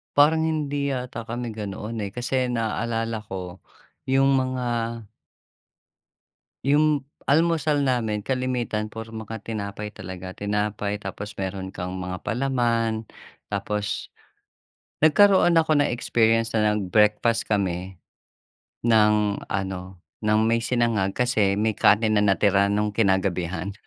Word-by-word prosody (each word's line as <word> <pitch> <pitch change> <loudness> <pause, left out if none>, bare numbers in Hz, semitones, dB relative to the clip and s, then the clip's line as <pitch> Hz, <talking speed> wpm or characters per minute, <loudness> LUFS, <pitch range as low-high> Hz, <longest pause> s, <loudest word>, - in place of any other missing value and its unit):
Parang 155 +3 +5
hindi 145 -3 -1
yata 125 -3 -4
kami 115 0 -5
ganoon, 105 +1 -5
eh, 100 - -4
kasi 125 +2 -1
naalala 115 -1 -2
ko, 95 -3 -7 0.5
yung 135 +1 +4
mga 130 -1 -1 2.0
Yung 150 +1 +3 0.2
almusal 155 -1 +2
namin 115 -6 0
kalimitan 125 -3 -1
puro 115 +1 -8
mga 110 -1 -7
tinapay 105 -1 -5
talaga. 95 -2 -8
Tinapay 105 0 -2
tapos 100 +2 -6
meron 95 0 -4
kang 90 +1 -5
mga 90 0 -5
palaman 115 -3 0 0.5
tapos 105 +1 -3 0.9
nagkaroon 190 +3 +6
ako 160 -1 +2
ng 145 - +2
experience 115 -1 +1
na 105 -1 +3
nag-breakfast 105 +3 +2
kami 95 -2 -1 0.9
ng 105 -2 +3
ano, 95 -1 -4 0.2
ng 105 0 +2
may 115 +1 +2
sinangag 115 -6 0
kasi 105 -6 +2
may 110 +1 +1
kanin 110 +2 +3
na - - +2
natira 100 0 +3
no'ng 105 +1 0
kinagabihan. 95 -2 0
110 Hz, 115 wpm, -24 LUFS, 100-125 Hz, 2.0 s, nagkaroon